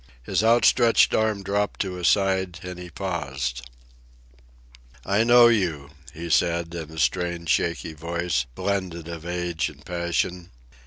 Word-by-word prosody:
His 95 Hz, -, 0 dB
outstretched 115 Hz, +1 st, +4 dB
arm 110 Hz, -2 st, +1 dB
dropped 100 Hz, +1 st, -1 dB
to 95 Hz, -2 st, -2 dB
his 90 Hz, -2 st, -1 dB
side, 95 Hz, -3 st, +1 dB
and 90 Hz, -1 st, -7 dB
he 90 Hz, 0 st, -8 dB
paused. 70 Hz, -9 st, -4 dB, 1.4 s
"I 100 Hz, +3 st, +2 dB
know 120 Hz, 0 st, +7 dB
you," 85 Hz, -11 st, 0 dB, 0.2 s
he 85 Hz, +2 st, -7 dB
said, 85 Hz, +1 st, +1 dB
in 80 Hz, -3 st, -6 dB
a 80 Hz, -, -11 dB
strange, 85 Hz, 0 st, -1 dB
shaky 85 Hz, +1 st, 0 dB
voice, 85 Hz, -5 st, -2 dB
blended 90 Hz, -3 st, -3 dB
of 85 Hz, 0 st, -7 dB
age 90 Hz, -2 st, -2 dB
and -, -, -16 dB
passion. 85 Hz, 0 st, -2 dB
85 Hz, 140 wpm, -24 LUFS, 85-95 Hz, 1.4 s, know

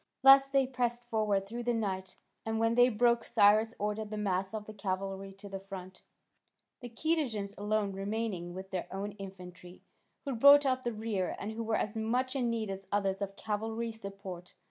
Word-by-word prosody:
Thus 270 Hz, 0 st, +8 dB
they 275 Hz, -1 st, +3 dB
pressed 245 Hz, -2 st, -1 dB
forward 215 Hz, -4 st, 0 dB
through 235 Hz, +4 st, -5 dB
the 240 Hz, 0 st, 0 dB
night, 190 Hz, -4 st, -3 dB, 0.3 s
and 225 Hz, 0 st, -2 dB
when 225 Hz, 0 st, +2 dB
day 245 Hz, +1 st, +6 dB
broke 235 Hz, +1 st, +3 dB
Cyrus 215 Hz, +2 st, +4 dB
ordered 210 Hz, +1 st, -2 dB
the 215 Hz, -, -5 dB
mass 190 Hz, -2 st, -1 dB
of 215 Hz, -1 st, -5 dB
the 215 Hz, -, -9 dB
cavalry 195 Hz, -1 st, -4 dB
to 195 Hz, +1 st, -11 dB
the 195 Hz, -1 st, -6 dB
front, 190 Hz, -1 st, -9 dB, 0.8 s
the 245 Hz, -, -8 dB
Cadousians 235 Hz, -7 st, -1 dB
alone 210 Hz, 0 st, 0 dB
remaining 195 Hz, -3 st, -3 dB
with 190 Hz, +1 st, -8 dB
their 185 Hz, -2 st, -3 dB
own 200 Hz, +2 st, -4 dB
infantry, 180 Hz, -2 st, -10 dB, 0.4 s
who 275 Hz, -, -2 dB
brought 280 Hz, +4 st, +8 dB
up 260 Hz, -1 st, +1 dB
the 240 Hz, -, -1 dB
rear, 215 Hz, -4 st, -2 dB
and 205 Hz, -, -5 dB
who 225 Hz, +1 st, -5 dB
were 225 Hz, -1 st, 0 dB
as 210 Hz, -, -2 dB
much 250 Hz, +4 st, 0 dB
in 250 Hz, -3 st, +1 dB
need 225 Hz, -3 st, -2 dB
as 195 Hz, 0 st, -7 dB
others 195 Hz, -1 st, 0 dB
of 195 Hz, 0 st, -3 dB
cavalry 225 Hz, +2 st, -3 dB
support. 195 Hz, -4 st, -9 dB
210 Hz, 190 wpm, -31 LUFS, 195-230 Hz, 0.8 s, Thus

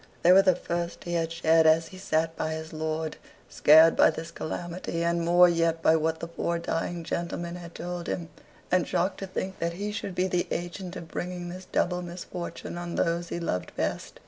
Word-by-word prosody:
They 175 Hz, -, +7 dB
were 190 Hz, +1 st, +9 dB
the 185 Hz, -2 st, +4 dB
first 170 Hz, -1 st, -4 dB
he 175 Hz, -, -4 dB
had 165 Hz, -1 st, 0 dB
shed 165 Hz, -1 st, +4 dB
as 160 Hz, +1 st, +4 dB
he 185 Hz, -, -11 dB
sat 160 Hz, -2 st, 0 dB
by 160 Hz, -, -2 dB
his 160 Hz, +1 st, -6 dB
lord, 155 Hz, 0 st, -3 dB, 0.3 s
scared 160 Hz, +2 st, +7 dB
by -, -, +6 dB
this 160 Hz, +1 st, -5 dB
calamity, 170 Hz, +1 st, -4 dB
and 170 Hz, 0 st, +1 dB
more 175 Hz, +1 st, +6 dB
yet 165 Hz, -1 st, +1 dB
by 160 Hz, -, +6 dB
what 160 Hz, 0 st, 0 dB
the 165 Hz, -, -4 dB
poor 170 Hz, 0 st, -2 dB
dying 170 Hz, +1 st, -3 dB
gentleman 170 Hz, +1 st, -3 dB
had 170 Hz, -1 st, -10 dB
told 175 Hz, 0 st, -5 dB
him, 170 Hz, -2 st, -3 dB, 0.4 s
and 180 Hz, -1 st, +3 dB
shocked 185 Hz, +2 st, 0 dB
to 195 Hz, -, -5 dB
think 190 Hz, 0 st, -4 dB
that 170 Hz, 0 st, -1 dB
he 205 Hz, +4 st, -3 dB
should 200 Hz, -3 st, -5 dB
be 180 Hz, -, +1 dB
the 180 Hz, -1 st, 0 dB
agent 175 Hz, +2 st, -4 dB
of 165 Hz, -, -7 dB
bringing 175 Hz, -1 st, -4 dB
this 185 Hz, +1 st, -8 dB
double 180 Hz, 0 st, 0 dB
misfortune 175 Hz, 0 st, -6 dB
on 175 Hz, -1 st, -5 dB
those 170 Hz, +1 st, 0 dB
he -, -, -3 dB
loved 90 Hz, -, -3 dB
best. -, -, -3 dB
170 Hz, 205 wpm, -27 LUFS, 165-180 Hz, 0.4 s, were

